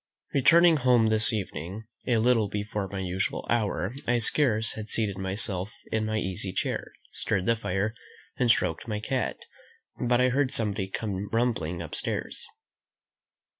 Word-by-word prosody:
Returning 165 +4 +6
home 125 -4 +4
this 110 0 +3
evening, 100 -1 -4 0.2
a 120 -3 +3
little 115 -2 +3
before 105 -1 -3
my 100 - -6
usual 95 +1 -1
hour, 105 -4 0 0.2
I 120 0 +3
scarce 115 -2 +2
had 110 -1 -7
seated 100 -4 0
myself 95 0 +1 0.2
in 110 -1 0
my 110 0 -1
easy 95 -1 -2
chair, - - -2 0.2
stirred 95 -3 -1
the 115 - +3
fire, 105 0 -1 0.4
and 125 - +1
stroked 115 - +2
my 105 -2 -2
cat, 130 +4 -2 0.7
but 120 0 +3
I 130 0 +4
heard 135 +1 +1
somebody 105 -6 0
come 100 -1 -3
rumbling 90 -8 -1
upstairs. 80 - -3
110 Hz, 145 wpm, -27 LUFS, 95-120 Hz, 0.7 s, Returning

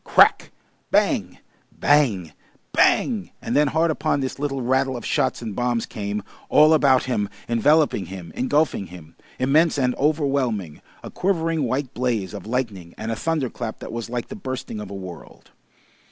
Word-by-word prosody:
Crack! - - +5 0.4
Bang! - - +1 0.3
Bang! 110 - +2 0.4
Bang! 220 -7 +2
And - - -3
then 150 0 +4
hard 160 +3 +2
upon 155 -2 0
this 130 0 -4
little 135 -3 -2
rattle 130 +1 +1
of 120 - -8
shots 130 -2 0
and 110 -4 -5
bombs 120 -2 0
came, 105 -2 -4 0.3
all 155 +1 +6
about 135 -4 +4
him, 105 -6 -1 0.2
enveloping 120 - +3
him, 90 -2 -8
engulfing 140 -6 0
him, 85 -2 -13 0.2
immense 150 +5 +3
and 125 -2 +2
overwhelming, 135 - 0 0.2
a - - -8
quivering 165 -5 0
white 130 +2 -2
blaze 115 -6 -1
of 100 -1 -8
lightning 110 -8 -3
and 110 +1 -4
a - - -1
thunder 155 +2 -1
clap 110 - -5
that - - -8
was 115 -1 -4
like 120 -1 -4
the - - -6
bursting 130 - -5
of 105 - -7
a 100 - -7
world. 90 -4 -10
130 Hz, 165 wpm, -23 LUFS, 105-145 Hz, 0.4 s, all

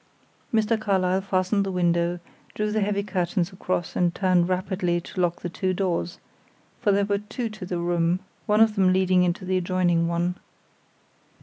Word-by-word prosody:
Mr. 220 0 +1
Carlyle 190 -2 +1
fastened 195 +1 +1
the 195 - -3
window, 175 -1 +1 0.4
drew 210 0 -1
the 215 0 0
heavy 200 0 0
curtains 185 -2 -1
across, 185 -2 -3
and 175 -1 +1
turned 185 -2 +2
rapidly 185 -1 0
to 180 +2 -5
lock 175 -1 -1
the - - -1
two 185 +2 -2
doors 175 -2 -1 0.6
for 210 - +3
there 200 0 +2
were 200 0 0
two 225 +3 -4
to 215 -4 -8
the 180 - -2
room, 170 0 +1 0.3
one 210 +1 +4
of 225 -1 +5
them 190 -3 +3
leading 185 -1 +3
into 180 +2 0
the 185 0 +1
adjoining 175 -2 +1
one. 175 +1 -1
185 Hz, 175 wpm, -25 LUFS, 175-200 Hz, 0.6 s, of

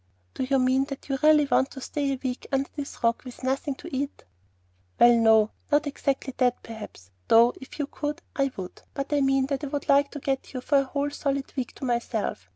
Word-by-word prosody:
"Do - - -5
you 265 +1 +2
mean 260 +1 +3
that 275 0 -8
you 270 -1 -1
really 305 -1 +6
want 275 -1 +2
to 270 - -9
stay 280 +1 -2
a 270 - -2
week 255 -1 -3
under 270 0 0
this 285 -4 -7
rock 230 0 +2
with 250 0 -11
nothing 270 +2 -1
to 265 - -8
eat?" 280 +2 -3 0.8
"Well, 240 0 +8
no; 220 -2 +5 0.2
not 295 +1 +4
exactly 275 -2 -2
that 250 -1 +1
perhaps, 210 - -10 0.2
though 235 +2 +6
if 265 - -11
you 290 - -1
could, 295 +2 -4 0.2
I 275 -1 +2
would. 185 -2 -7
But 275 +1 -3
I 290 - +3
mean 270 -1 +3
that 275 +1 -3
I - - -2
would 285 +1 -4
like 280 0 +4
to 290 - -7
get 270 -1 -2
you 255 - -3
for 280 +2 +3
a 275 - 0
whole 285 +2 -2
solid 275 -1 -2
week 260 -3 -3
to 275 - -6
myself. 230 - -2
270 Hz, 225 wpm, -26 LUFS, 250-280 Hz, 0.8 s, Well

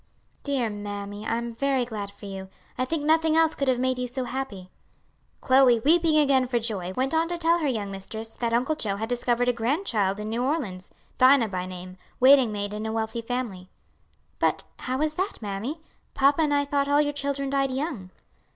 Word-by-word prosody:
'" - - -42
"Dear 265 -6 0
mammy, 205 0 -6
I 230 - 0
am 235 0 -4
very 265 +1 0
glad 210 -4 -5
for 200 +1 -13
you; 190 -1 -7 0.3
I 255 - -1
think 310 +2 -2
nothing 320 +1 +3
else 325 -1 +4
could 275 - -2
have 255 -1 +3
made 255 0 0
you 250 - -2
so 255 +1 -3
happy." 245 -7 -5 0.7
Chloe, 255 -2 +5
weeping 320 +3 +4
again 275 -4 +3
for 245 -1 0
joy, 210 -6 -2
went 260 +7 -1
on 325 +1 +2
to 345 0 -2
tell 335 +1 +2
her 310 - 0
young 215 -6 -2
mistress 220 +3 -6
that 230 +1 -3
Uncle 245 +6 +1
Joe 205 -9 -2
had 220 +2 -3
discovered 245 0 +1
a 245 - +3
grandchild 230 - 0
in 210 - -4
New 230 +2 -2
Orleans, 250 - -2 0.3
Dinah 255 -3 +6
by 185 -1 -3
name, 185 0 -9 0.2
waiting 260 -3 +6
maid 205 0 -3
in 215 +1 -4
a - - -2
wealthy 220 +1 -2
family. 230 -6 -4 0.7
"But - - +1 0.2
how 260 +2 -2
is 305 0 +1
that, 380 +5 -3
mammy? 220 +9 -4 0.3
Papa 280 +3 +4
and 300 -2 +2
I 285 0 +2
thought 280 0 0
all 285 +1 +3
your 290 -1 +1
children 280 -1 -2
died 275 -1 +1
young." 260 - -4
250 Hz, 205 wpm, -26 LUFS, 210-280 Hz, 0.7 s, Dinah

